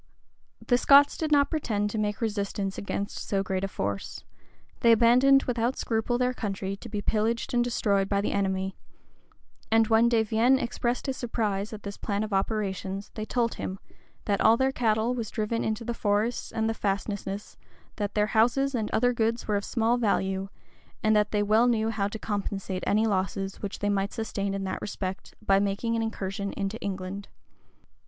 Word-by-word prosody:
The 245 -1 +3
Scots 285 +2 +6
did 315 -1 -3
not 285 -1 +4
pretend 210 -9 -1
to 220 - -2
make 210 +1 -2
resistance 200 -3 -2
against 200 0 -4
so 195 -1 -1
great 190 0 -2
a - - +1
force: 100 - -4 0.6
they 235 - +5
abandoned 250 +4 +6
without 240 +1 -1
scruple 230 +1 0
their 250 0 +1
country 195 -4 -3
to - - -10
be 205 -2 -4
pillaged 225 +3 0
and 240 0 +3
destroyed 200 -5 +1
by 200 - +2
the 200 - -1
enemy: 190 -1 -1 1.0
and 225 0 +4
when 225 +1 +5
De 230 -2 +3
Vienne 225 +5 +3
expressed 240 0 -2
his 265 -1 -2
surprise 215 -4 -2
at 215 -2 -8
this 200 0 -6
plan 205 0 -2
of 215 -1 -4
operations, 195 -1 -2
they 215 - -4
told 235 0 0
him, 190 - -5 0.5
that 200 -2 +1
all 225 +1 +6
their 265 +1 +2
cattle 225 -1 +1
was 230 -4 -3
driven 220 +2 -2
into 220 +1 -2
the 235 - -2
forests 215 +2 0
and 220 0 -1
fastnesses; 200 0 -3 0.4
that 205 -1 -3
their 210 - +3
houses 260 +5 +3
and 220 -4 -1
other 245 +2 +2
goods 230 0 0
were 210 - +1
of 200 - 0
small 230 +2 +1
value; 195 -4 0 0.5
and 215 0 +4
that 210 0 +3
they 210 -1 +1
well 215 +4 +4
knew 225 -2 +1
how 200 -2 0
to 205 - -6
compensate 200 -3 -3
any 215 +2 +3
losses 195 -1 -2
which 200 -2 -4
they 205 - -1
might 200 -1 0
sustain 200 -3 -2
in 195 - -3
that 190 - -3
respect, 190 -2 -5
by 195 0 +4
making 205 +4 -1
an 225 - 0
incursion 200 -3 -3
into 200 +2 -3
England. 195 0 -5
215 Hz, 185 wpm, -27 LUFS, 200-230 Hz, 1.0 s, Scots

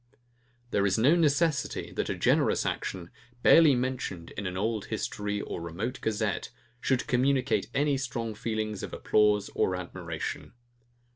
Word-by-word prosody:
There 100 - +2
is 95 - +1
no 135 +9 +5
necessity, 155 -2 +1
that - - -2
a - - -1
generous - - +2
action, 85 -2 -3 0.3
barely 160 -5 +7
mentioned 125 -9 -3
in 100 -1 -4
an 90 0 -4
old 110 +1 -1
history 105 0 -3
or - - -5
remote 95 +10 -4
gazette, 110 -1 -1 0.3
should 130 0 0
communicate 130 +1 +1
any 145 0 +2
strong 120 -4 -3
feelings 110 -1 -3
of - - -6
applause 105 -1 +2
and 95 - +1
admiration. 85 0 -5
110 Hz, 140 wpm, -28 LUFS, 100-130 Hz, 0.3 s, barely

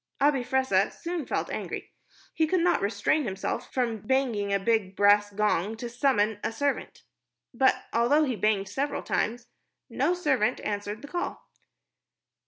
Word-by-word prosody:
Abi 280 -2 +3
Fressah 245 -7 +2
soon 340 -4 -5
felt - - -2
angry. - - -5 0.4
He 320 - +1
could 365 +2 +1
not 350 +1 +2
restrain 205 +9 +1
himself 195 -5 -4
from 235 -4 -1
banging 215 -3 0
a 200 - +3
big 200 -2 0
brass 205 +1 +5
gong 210 0 0
to 240 - -5
summon 225 -5 +1
a - - -1
servant. 285 +4 -2 0.5
But 260 +2 +2
although 255 +7 +4
he 260 -5 0
banged 210 -2 +1
several 275 +8 -2
times, 235 +2 -1 0.5
no 360 - +1
servant 265 -9 +1
answered 205 +2 -4
the - - -7
call. 350 +4 -4
235 Hz, 150 wpm, -27 LUFS, 205-275 Hz, 0.5 s, brass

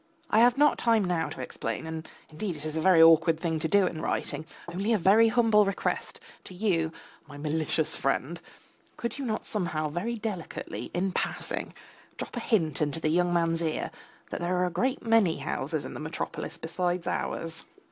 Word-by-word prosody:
I 215 - +5
have 245 +2 +5
not 295 +1 +4
time 225 -4 +3
now 170 -3 0
to - - -7
explain, 115 0 -4
and 160 0 -6 0.2
indeed 175 +3 -3
it 150 0 -7
is 155 0 -4
an 160 - -1
awkward 165 -2 +6
thing 160 -2 -1
to 160 - 0
do 200 +2 +4
in 160 -3 -3
writing, 155 -1 -2 0.2
only 195 +6 0
a - - +4
very 205 +5 +5
humble 225 -2 +4
request 195 -1 -2 0.3
to 185 - -9
you, 175 -5 +1 0.4
my 145 - -10
malicious 155 +1 0
friend: 135 +5 -1 0.6
could 235 +3 -4
you 275 - -3
not 220 -2 -2
somehow 160 -7 -2
very 190 +10 -2
delicately, 210 -6 -5
in 190 +2 0
passing, - - -3 0.4
drop - - -6
a - - -1
hint 160 - +1
into 150 +1 0
the 155 - 0
young 175 +2 +2
man's 165 -1 +1
ear 160 -2 -2 0.4
that - - -3
there 180 +1 0
are 180 - +2
a 180 - -2
great 250 +11 -1
many 225 -7 +4
houses - - -2
in - - -6
the - - -7
metropolis - - -5
besides 175 +1 -2
ours? 165 0 -3
175 Hz, 190 wpm, -28 LUFS, 160-210 Hz, 0.6 s, awkward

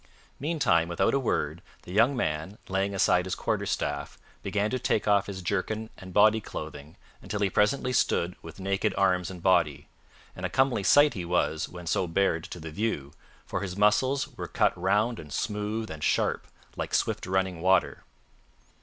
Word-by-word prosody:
Meantime, 135 - +2
without 85 0 +1
a 140 - +3
word, 80 - -1 0.2
the - - -10
young 120 +6 +4
man, 80 0 -2
laying 95 +1 -1
aside 90 -2 +3
his 90 - -2
quarterstaff, 70 0 -2 0.2
began 105 0 0
to 130 - -1
take 110 - 0
off 100 -1 +3
his 95 -2 -6
jerkin 110 +4 -2
and 95 0 -11
body 110 +3 +5
clothing 75 -3 -8 0.3
until 105 - -4
he 100 -2 +2
presently 125 +6 +1
stood 90 -6 +1
with 80 +3 -11
naked 95 +1 0
arms 90 -2 +2
and 90 -2 -9
body; 85 -6 +2 0.5
and - - -9
a - - 0
comely 130 -5 +2
sight 145 +8 +5
he 90 - -4
was 85 -2 0
when 90 -1 -9
so 90 +2 0
bared 80 -1 +1
to 90 - -8
the 80 0 -7
view, 75 -7 -2 0.3
for - - -3
his 95 -1 -5
muscles 130 +7 +3
were - - -5
cut - - +1
round 105 +6 +1
and 75 - -10
smooth 105 +3 -2
and 80 -1 -7
sharp - - +1 0.3
like - - -2
swift - - 0
running 95 -2 0
water. 95 0 +2
95 Hz, 175 wpm, -28 LUFS, 85-105 Hz, 0.5 s, body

